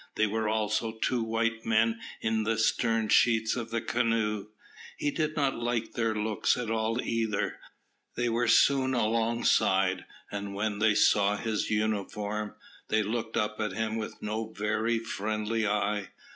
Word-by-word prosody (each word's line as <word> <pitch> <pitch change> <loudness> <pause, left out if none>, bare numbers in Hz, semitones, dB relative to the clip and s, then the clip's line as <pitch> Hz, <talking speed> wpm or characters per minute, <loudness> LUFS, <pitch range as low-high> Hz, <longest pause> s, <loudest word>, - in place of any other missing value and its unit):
There 110 -1 +2
were 110 0 -1
also 110 +1 0
two 115 +2 -1
white 115 0 -1
men 115 0 +2 0.2
in 110 0 +1
the 110 +1 0
stern 115 0 +1
sheets 110 -2 +4
of 115 -2 -4
the 115 0 -1
canoe. 110 -3 0 0.5
He 145 - 0
did 155 0 -1
not 140 -5 0
like 120 -1 -1
their 115 -2 0
looks 105 +1 +1
at 120 -3 -3
all 115 +1 0
either. 110 -3 -1 0.6
They 120 0 0
were 120 +1 +1
soon 130 -2 +4
alongside, 110 -5 +2 0.3
and 100 -1 -5
when 105 0 -1
they 110 -1 +3
saw 105 0 +4
his 110 0 -2
uniform, 105 0 -2 0.3
they 110 0 +2
looked 110 +1 -3
up 105 -1 -1
at 105 -3 -1
him 110 +1 -2
with 110 -1 -5
no 110 +1 -2
very 110 +3 0
friendly 110 0 -2
eye. 105 0 0
110 Hz, 155 wpm, -29 LUFS, 105-115 Hz, 0.6 s, sheets